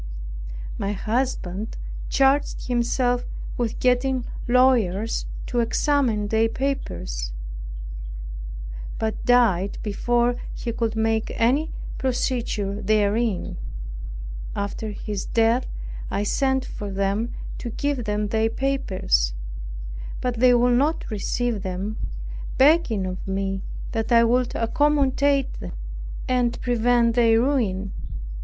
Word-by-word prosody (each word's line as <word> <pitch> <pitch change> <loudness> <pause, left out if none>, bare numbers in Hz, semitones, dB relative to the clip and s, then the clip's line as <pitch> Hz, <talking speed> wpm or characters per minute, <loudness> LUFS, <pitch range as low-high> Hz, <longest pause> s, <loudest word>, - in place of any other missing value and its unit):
My 200 +1 0
husband 215 -2 -1 0.3
charged 275 +1 +3
himself 245 0 +1 0.3
with 235 -2 -1
getting 250 0 +2 0.2
lawyers 235 -5 +3 0.2
to 245 - 0
examine 235 -3 +2
their 225 +1 +3
papers, 85 - -2 1.6
but 220 -1 -2
died 220 -6 +4
before 240 +3 +1 0.2
he 235 - -3
could 225 -1 -1
make 220 0 +1
any 275 +8 +3 0.3
procedure 235 -6 0
therein. 210 0 +1 1.0
After 205 +2 -3
his 205 -1 -4
death 230 +2 +3 0.4
I 205 - 0
sent 265 +4 +1
for 205 - -5
them 200 +4 0 0.2
to 235 - -4
give 275 0 -1
them 210 0 0
their 220 +1 +2
papers; 185 - +1 0.8
but 245 -2 -1
they 250 0 +7
would 245 0 +4
not 300 -1 0
receive 220 +1 -1
them, 190 +3 -3 0.6
begging 270 - +4
of 185 0 -5
me 195 0 -1 0.3
that 225 +1 -2
I 230 -1 +7
would 245 +1 +2
accommodate 280 +2 +2
them, - - -6 0.5
and 245 -2 +1
prevent 240 -1 +3
their 230 -1 +5
ruin. 215 -8 +1
230 Hz, 105 wpm, -24 LUFS, 205-250 Hz, 1.6 s, they